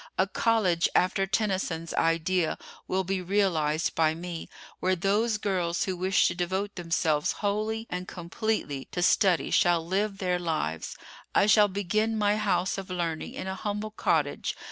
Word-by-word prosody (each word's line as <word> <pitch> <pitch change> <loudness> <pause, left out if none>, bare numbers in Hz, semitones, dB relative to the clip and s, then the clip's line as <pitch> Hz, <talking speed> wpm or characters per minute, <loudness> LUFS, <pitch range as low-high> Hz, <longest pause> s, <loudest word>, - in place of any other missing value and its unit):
A 190 - +4
college 195 -4 +2
after 195 +2 +2
Tennyson's 190 -6 -1
idea 165 +1 +1 0.3
will 190 +1 0
be 190 0 -2
realized 170 -5 +1
by 160 -1 +2
me, 170 0 -6 0.3
where 185 +1 +1
those 210 +5 +1
girls 180 -4 -1
who 190 -4 -2
wish 185 +1 +3
to - - -1
devote 190 +3 -2
themselves 165 -3 0
wholly 215 +2 -2
and 180 +1 -5
completely 175 - -3
to 175 - -1
study 185 -1 +3
shall 170 -2 +3
live 195 +3 -1
their 180 -2 0
lives. 155 - -3 0.4
I - - +5
shall 210 0 +6
begin 210 +3 0
my 210 0 +2
house 195 -2 0
of 190 - -8
learning 170 -3 -3
in - - -5
a 190 - -3
humble 210 +2 -4
cottage. - - 0
185 Hz, 155 wpm, -28 LUFS, 170-205 Hz, 0.4 s, shall